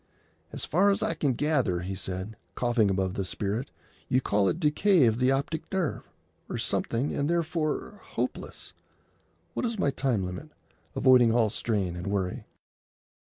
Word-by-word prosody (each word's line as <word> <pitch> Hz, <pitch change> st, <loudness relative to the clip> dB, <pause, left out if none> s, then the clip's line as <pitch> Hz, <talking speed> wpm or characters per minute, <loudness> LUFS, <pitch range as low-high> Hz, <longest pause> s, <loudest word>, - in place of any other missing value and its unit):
"As -, -, -4 dB
far 190 Hz, +6 st, +3 dB
as 200 Hz, -, +1 dB
I -, -, +1 dB
can 145 Hz, -5 st, 0 dB
gather," 130 Hz, -, +1 dB
he 95 Hz, +2 st, -4 dB
said, 95 Hz, +3 st, -4 dB, 0.2 s
coughing 120 Hz, -4 st, +2 dB
above 95 Hz, -1 st, 0 dB
the 95 Hz, -, -2 dB
spirit, 105 Hz, +7 st, -3 dB, 0.4 s
"you 130 Hz, -, +4 dB
call 100 Hz, -5 st, +2 dB
it 165 Hz, -, -2 dB
decay 170 Hz, +1 st, +4 dB
of 115 Hz, 0 st, +2 dB
the 125 Hz, 0 st, +3 dB
optic 140 Hz, +4 st, -2 dB
nerve, 185 Hz, -6 st, -2 dB, 0.4 s
or -, -, -3 dB
something, 125 Hz, +5 st, 0 dB
and 145 Hz, +2 st, 0 dB
therefore 165 Hz, -2 st, -1 dB
hopeless. -, -, -4 dB, 0.8 s
What -, -, -2 dB
is 230 Hz, -2 st, -1 dB
my 145 Hz, -7 st, +2 dB
time 130 Hz, -7 st, 0 dB
limit, 90 Hz, +13 st, -6 dB, 0.5 s
avoiding 125 Hz, -3 st, +6 dB
all 115 Hz, -3 st, +3 dB
strain 100 Hz, -7 st, -1 dB
and 90 Hz, +2 st, -5 dB
worry?" 95 Hz, -2 st, -2 dB
125 Hz, 160 wpm, -28 LUFS, 100-150 Hz, 0.8 s, avoiding